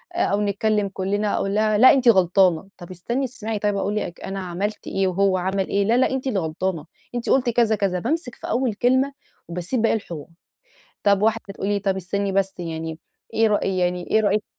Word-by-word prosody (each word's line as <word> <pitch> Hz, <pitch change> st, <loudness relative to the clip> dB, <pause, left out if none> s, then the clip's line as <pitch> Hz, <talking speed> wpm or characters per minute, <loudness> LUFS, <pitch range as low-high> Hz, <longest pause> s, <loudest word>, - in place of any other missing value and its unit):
أو 210 Hz, -, +1 dB
نتكلم 205 Hz, 0 st, 0 dB
كُلنا 200 Hz, +2 st, -1 dB
أقول 195 Hz, +1 st, -1 dB
لها: 215 Hz, 0 st, +2 dB
"لأ 255 Hz, +6 st, +8 dB
أنتِ 260 Hz, -3 st, +1 dB
غلطانة" 185 Hz, -3 st, +3 dB
طب 175 Hz, 0 st, -11 dB
استني 235 Hz, +10 st, -2 dB
تسمعي 225 Hz, -3 st, -5 dB
طيب 205 Hz, 0 st, 0 dB
هاقول 200 Hz, +1 st, -1 dB
لِك 175 Hz, -5 st, -4 dB
أنا 195 Hz, 0 st, -5 dB
عملت 190 Hz, +3 st, -4 dB
إيه 195 Hz, 0 st, 0 dB
وهو 190 Hz, +1 st, +2 dB
عمل 190 Hz, +1 st, -1 dB
إيه 200 Hz, -, +1 dB
لا، 230 Hz, +3 st, +3 dB
لا، -, -, +3 dB
لأ، -, -, 0 dB
أنتِ 265 Hz, 0 st, -2 dB
اللي 215 Hz, -7 st, 0 dB
غلطانة 165 Hz, +1 st, -3 dB, 0.3 s
أنتِ 240 Hz, -, -3 dB
قلتِ 250 Hz, -2 st, +3 dB
كذا 230 Hz, -2 st, +3 dB
كذا 195 Hz, -3 st, 0 dB
بامسك 300 Hz, -, -2 dB
في -, -, -9 dB
أول 245 Hz, -3 st, 0 dB
كلمة 260 Hz, +5 st, +2 dB, 0.3 s
وباسيب 180 Hz, +8 st, -2 dB
باقي 230 Hz, -, +3 dB
الحوار. 170 Hz, -9 st, -6 dB, 0.8 s
طب 200 Hz, -1 st, +3 dB
واحدة 225 Hz, +1 st, +1 dB
تقول 195 Hz, -, -4 dB
لي 205 Hz, -1 st, +1 dB
طب 195 Hz, -1 st, 0 dB
استني 195 Hz, +2 st, -2 dB
بس 195 Hz, -1 st, -1 dB
يعني 160 Hz, -1 st, -5 dB, 0.3 s
إيه 225 Hz, 0 st, +3 dB
رأي 200 Hz, -3 st, 0 dB
يعني 180 Hz, 0 st, -1 dB
إيه 220 Hz, -, +4 dB
رأيِك 210 Hz, 0 st, +1 dB
200 Hz, 205 wpm, -23 LUFS, 185-220 Hz, 0.8 s, لأ